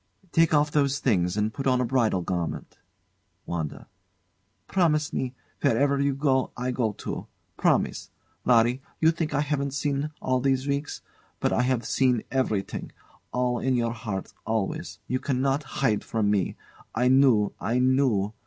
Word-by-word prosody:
] - - -44
Take 165 -1 +4
off 150 -1 +3
those 140 -2 +2
things 95 -9 +1
and 105 +1 0
put 135 +3 -3
on 130 -1 +3
a 125 - +1
bridal 115 -7 +1
garment. 85 -2 -4 0.7
WANDA. 80 -4 -4 0.8
Promise 155 -5 +1
me 130 0 -2 0.3
wherever 140 +4 +2
you 140 -1 +1
go, 135 -2 +1
I 125 +1 -1
go 115 -4 0
too. - - -6 0.3
Promise! - - +1 0.3
Larry, 120 +1 +3 0.2
you 160 0 +5
think 160 -3 -2
I 145 - +2
haven't 140 -2 -1
seen, 140 +1 -1
all 130 0 +1
these 135 +1 +1
weeks. 140 +1 -2 0.4
But - - +1
I - - +2
have 125 -2 0
seen 125 -4 +2
everything; 110 -7 -1 0.4
all 125 -1 0
in 130 -1 +1
your 115 -1 0
heart, 105 -5 -5
always. 110 -3 -2
You 130 - -1
cannot 135 +1 0 0.2
hide 105 -5 +2
from 105 -2 0
me. 100 -4 0 0.4
I 125 +3 +2
knew 130 -6 +4
I 115 +6 0
knew! 125 -6 +2
130 Hz, 160 wpm, -26 LUFS, 110-140 Hz, 0.8 s, you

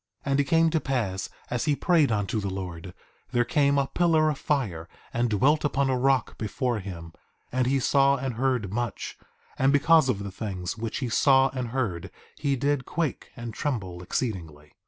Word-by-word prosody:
1:6 140 - -1
And 135 - +2
it - - +4
came 165 +3 +4
to 160 - +2
pass 110 -10 -2 0.2
as 125 +4 -1
he 150 -2 +2
prayed 155 -5 +3
unto 105 +1 0
the 100 -1 -3
Lord, 90 -2 -6 0.4
there 120 0 +3
came 140 +2 +2
a 140 - +3
pillar 160 0 +2
of 145 - -6
fire 95 - -1 0.2
and 120 0 +1
dwelt 135 +9 +3
upon 140 -2 +1
a - - +2
rock 130 0 +1
before 115 +2 -1
him; 85 -4 -8 0.4
and 125 0 +1
he 135 +1 +2
saw 140 +1 +4
and 130 -1 -3
heard 120 -5 -1
much; 120 +1 -4 0.4
and 135 +1 +4
because 150 0 +5
of 100 -5 0
the 100 - -5
things 95 -3 -4
which 115 -1 -4
he 125 - -1
saw 135 +3 +4
and 125 -2 -3
heard 105 -8 -2 0.3
he 140 -2 +1
did 140 +1 0
quake 165 -1 -3
and 120 -3 -6
tremble 95 -12 -3
exceedingly. 85 - -4
125 Hz, 190 wpm, -26 LUFS, 100-140 Hz, 0.4 s, because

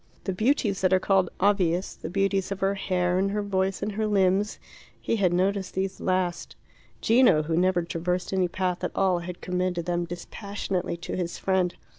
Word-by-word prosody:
The 190 - -2
beauties 215 -1 +1
that 185 -1 +3
are 185 - +5
called 190 -2 +2
obvious 185 -2 +2
the - - -7
beauties 195 +1 0
of 195 - -3
her 195 +1 +2
hair 180 -2 0
and 195 +1 +1
her 205 +1 -1
voice 195 -1 -1
and 210 - -1
her 215 +1 -1
limbs 200 0 +2 0.4
he 230 - -1
had 185 -4 +2
noticed 190 +1 0
these 190 0 -2
last; 185 -2 -1 0.5
Gino, 225 -9 +5
who 160 +1 -1
never 180 0 +2
traversed 180 +2 -2
any 185 -1 +2
path 180 0 -2
at - - -3
all, 185 -2 +2
had 175 +1 -7
commended 180 -2 -1
them 175 0 -1
dispassionately 185 +1 -4
to 170 - -5
his 175 -2 -3
friend. 185 -2 0
185 Hz, 185 wpm, -26 LUFS, 180-195 Hz, 0.5 s, are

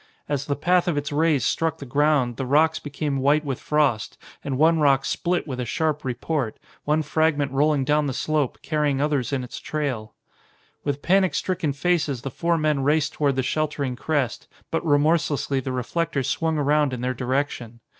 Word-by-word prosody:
As 145 -1 -2
the 140 - 0
path 175 +4 +2
of 170 -4 0
its 145 +1 -2
rays 150 -2 +2
struck 160 -1 0
the 140 - -8
ground 140 -3 +1
the 135 - -2
rocks 155 +4 +3
became 145 -1 -3
white 145 +3 +2
with 135 -3 -3
frost 145 -8 0 0.3
and 135 -2 -2
one 160 +3 +4
rock 140 -2 +3
split 175 -1 -1
with 130 -3 -5
a - - -1
sharp 155 +3 -1
report, 130 -1 -2 0.3
one 150 +1 +2
fragment 150 -2 +1
rolling 140 0 +2
down 150 +1 +2
the 135 - -2
slope, 150 -1 -1
carrying 150 -3 0
others 145 -3 0
in 135 -2 -1
its 125 - -7
trail. 130 -8 -3 0.7
With 145 0 -3
panic 185 -4 +3
stricken 170 -4 -1
faces 150 -4 0
the 135 - -4
four 170 +5 0
men 155 -3 +1
raced 150 +2 +1
toward 140 -3 +1
the 130 - 0
sheltering 145 -2 -1
crest, 135 -3 -2 0.2
but 165 - -1
remorselessly 145 -2 +2
the 130 0 -4
reflector 140 +3 -1
swung 160 +4 0
around 145 -1 +2
in 125 - -4
their 130 +1 -1
direction. 125 -2 -2
145 Hz, 185 wpm, -24 LUFS, 135-155 Hz, 0.7 s, one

